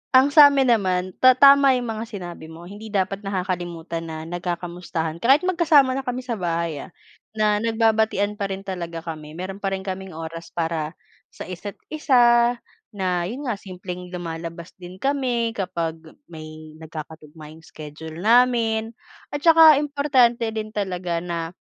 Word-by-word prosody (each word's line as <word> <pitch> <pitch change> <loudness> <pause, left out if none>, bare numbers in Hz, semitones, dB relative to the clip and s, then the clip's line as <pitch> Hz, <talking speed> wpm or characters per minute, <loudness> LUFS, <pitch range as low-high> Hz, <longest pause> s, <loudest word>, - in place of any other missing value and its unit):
Ang 260 +1 +7
sa 295 -1 +10
amin 270 -3 +2
naman, 185 -4 +1
ta 255 -1 +7
tama 275 -1 +7
'yung 245 - -4
mga 220 0 -4
sinabi 175 -6 -8
mo, 165 +1 -11
hindi 205 +4 -10
dapat 195 -1 -1
nakakalimutan 175 -4 -4
na 160 0 -6
nagkakamustahan 175 -1 -4
kahit 270 +8 +4
magkasama 330 -7 +4
na 270 - -2
kami 250 +1 -3
sa 245 - -2
bahay, 170 -3 -2
ah, - - -10 0.5
na 210 -1 +2
nagbabatian 220 -2 +1
pa 200 - -1
rin 195 0 -5
talaga 170 -3 -5
kami. 155 -2 -8
Meron 190 +2 -6
pa 195 - 0
rin 190 - -7
kaming 190 -2 -6
oras 165 +1 -7
para 160 -1 -2 0.3
sa - - -9
isa't-isa, 240 - +2 0.4
na 180 -3 -1
'yun 255 +9 -6
nga 220 -5 -2
simpleng 180 -1 -8
lumalabas 170 -1 -7
din 180 +1 -10
kami 250 -2 0
kapag 170 -5 -3 0.3
may 155 -1 -10
nagkakatugma 155 -1 -10
'yung 160 - -16
schedule 155 0 -10
namin 230 -1 +3 0.4
at 290 - -5
saka 325 -2 +8
importante 275 -5 +2
din 215 -1 -5
talaga 180 -4 -2
na 170 -1 -4
190 Hz, 150 wpm, -23 LUFS, 170-235 Hz, 0.5 s, sa